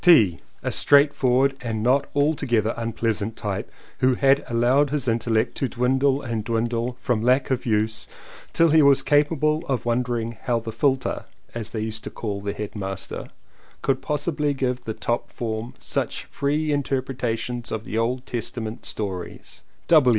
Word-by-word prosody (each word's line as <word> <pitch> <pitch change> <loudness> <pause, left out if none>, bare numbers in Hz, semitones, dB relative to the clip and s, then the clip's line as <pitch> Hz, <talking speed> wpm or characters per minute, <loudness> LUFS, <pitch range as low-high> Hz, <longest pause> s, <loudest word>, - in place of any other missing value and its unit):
T., 110 - +6 0.2
a - - -1
straight 145 0 +5
forward 135 +2 +2
and 110 -3 -3
not 130 +4 +3
altogether 140 -7 +2
unpleasant 115 -2 -2
type 100 -2 -4 0.3
who 130 0 +3
had 135 +2 +4
allowed 125 +4 +3
his 140 -2 -1
intellect 115 0 +1
to 135 - 0
dwindle 130 +3 +1
and 115 -3 -2
dwindle 115 +2 -1
from 120 -4 0
lack 130 +3 +2
of 130 -1 -1
use 110 0 0 0.4
till 165 0 +4
he 160 0 +6
was 140 -2 +5
capable 150 +1 +2
of 130 -4 -1
wondering 120 -1 0
how 120 -2 +1
the 115 0 -6
"Futler," 130 +3 0 0.3
as 115 -2 -4
they 110 -1 -4
used 110 0 -4
to - - -3
call 100 -3 -4
the 100 0 -3
headmaster, 95 -2 -5 0.6
could - - +1
possibly 150 -1 0
give 125 -2 -1
to 125 - -31
the 110 - -3
top 120 0 -2
form 115 0 -4
such - - -2
free 150 +2 -1
interpretations 125 -4 -2
of 110 -1 -3
the 110 - -2
Old 125 +3 -1
Testament 115 -2 -4
stories. 95 -4 -5
120 Hz, 160 wpm, -24 LUFS, 110-135 Hz, 0.6 s, T